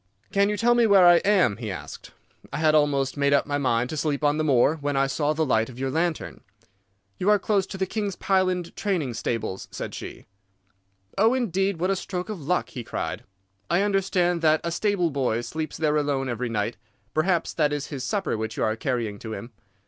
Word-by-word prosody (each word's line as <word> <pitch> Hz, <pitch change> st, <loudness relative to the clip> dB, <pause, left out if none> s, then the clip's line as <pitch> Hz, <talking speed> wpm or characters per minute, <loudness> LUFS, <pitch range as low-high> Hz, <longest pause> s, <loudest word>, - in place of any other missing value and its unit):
"'Can 200 Hz, 0 st, +3 dB
you 210 Hz, -, -1 dB
tell 240 Hz, +2 st, +4 dB
me 240 Hz, -1 st, +4 dB
where 195 Hz, -3 st, +6 dB
I 175 Hz, 0 st, +8 dB
am?' 185 Hz, -, +3 dB
he 115 Hz, -2 st, -5 dB
asked. 95 Hz, -, -8 dB, 0.4 s
'I -, -, -3 dB
had 155 Hz, 0 st, +3 dB
almost 145 Hz, -2 st, +2 dB
made 140 Hz, 0 st, +2 dB
up 140 Hz, -, +3 dB
my 145 Hz, -1 st, -1 dB
mind 125 Hz, -3 st, +1 dB
to -, -, -3 dB
sleep 145 Hz, -1 st, -1 dB
on 145 Hz, 0 st, +3 dB
the 155 Hz, -, 0 dB
moor, 145 Hz, +2 st, +3 dB
when 145 Hz, -1 st, -2 dB
I 135 Hz, -, +3 dB
saw 145 Hz, +2 st, 0 dB
the 160 Hz, +1 st, 0 dB
light 115 Hz, -4 st, +1 dB
of 125 Hz, -, -11 dB
your 135 Hz, 0 st, -2 dB
lantern.' 165 Hz, +1 st, -2 dB, 0.8 s
"'You 190 Hz, -, +1 dB
are 210 Hz, -, +6 dB
close 195 Hz, -1 st, 0 dB
to 195 Hz, -, -7 dB
the 190 Hz, -, 0 dB
King's 205 Hz, -1 st, -3 dB
Pyland 185 Hz, -3 st, 0 dB
training 175 Hz, -11 st, -1 dB
stables,' 110 Hz, -4 st, -3 dB
said -, -, -6 dB
she. -, -, -8 dB, 0.9 s
"'Oh, 225 Hz, +4 st, +4 dB
indeed! 195 Hz, -6 st, 0 dB
What 185 Hz, +3 st, +1 dB
a -, -, +2 dB
stroke 180 Hz, +1 st, -5 dB
of 205 Hz, -6 st, -5 dB
luck!' 175 Hz, +6 st, 0 dB
he 125 Hz, -, -7 dB
cried. 90 Hz, -4 st, -4 dB, 0.4 s
'I 180 Hz, +3 st, +3 dB
understand 185 Hz, -4 st, +1 dB
that 155 Hz, -1 st, +4 dB
a 170 Hz, -, -2 dB
stable 180 Hz, -2 st, +1 dB
boy 125 Hz, -5 st, 0 dB
sleeps 155 Hz, +5 st, -5 dB
there 155 Hz, -1 st, +1 dB
alone 140 Hz, -3 st, 0 dB
every 120 Hz, +1 st, -2 dB
night. 110 Hz, 0 st, -2 dB, 0.4 s
Perhaps 170 Hz, +2 st, +1 dB
that 150 Hz, -2 st, +1 dB
is 145 Hz, 0 st, -3 dB
his 135 Hz, -3 st, -4 dB
supper 190 Hz, -, -1 dB
which 110 Hz, 0 st, -4 dB
you -, -, 0 dB
are 110 Hz, -, +1 dB
carrying 115 Hz, -5 st, -2 dB
to 110 Hz, -1 st, -6 dB
him. 115 Hz, +2 st, -7 dB
155 Hz, 215 wpm, -25 LUFS, 130-190 Hz, 0.9 s, I